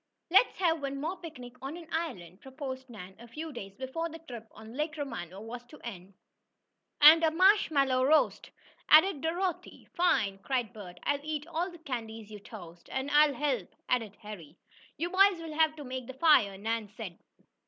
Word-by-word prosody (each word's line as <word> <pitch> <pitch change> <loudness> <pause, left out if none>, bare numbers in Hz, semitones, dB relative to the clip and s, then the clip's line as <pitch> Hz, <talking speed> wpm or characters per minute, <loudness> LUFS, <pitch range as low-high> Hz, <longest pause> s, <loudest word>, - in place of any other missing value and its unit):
"Let's 390 +7 +5
have 330 -4 +1
one 275 0 -3
more 330 +6 -3
picnic 255 -8 -10
on 275 +5 -5
an 340 - -10
island!" 210 - -4
proposed 265 -1 -7
Nan, 190 -5 -10
a 235 - -12
few 310 +6 -7
days 195 -5 -8
before 265 +7 -4
the 325 - -8
trip 245 -9 -10
on 220 +1 -12
Lake 300 +3 -3
Romano 210 - -5
was 235 +2 -7
to 300 +5 -15
end. 195 -4 -8 0.9
"And 315 +3 +9
a 320 - +5
marshmallow 315 -8 +4
roast!" 310 +3 +2 0.4
added 315 -1 +6
Dorothy. 350 +3 -3
"Fine!" 225 - +2
cried 245 0 -2
Bert. 195 -5 -10
"I'll 285 -1 +1
eat 300 -1 -3
all 340 +2 -2
the 345 - -12
candies 225 -8 -6
you 210 - -8
toast!" 175 -5 -12
"And 265 +2 -2
I'll 295 -1 +5
help!" 265 -10 -1 0.2
added 225 -5 0
Harry. 180 -7 -10 0.4
"You 340 +4 -2
boys 385 -1 +5
will 325 -2 -7
have 315 0 +3
to 300 - -8
make 255 -2 -6
the 260 - -7
fire," 260 -10 +4
Nan 220 +1 -2
said. 195 -7 -7
265 Hz, 180 wpm, -30 LUFS, 220-320 Hz, 0.9 s, And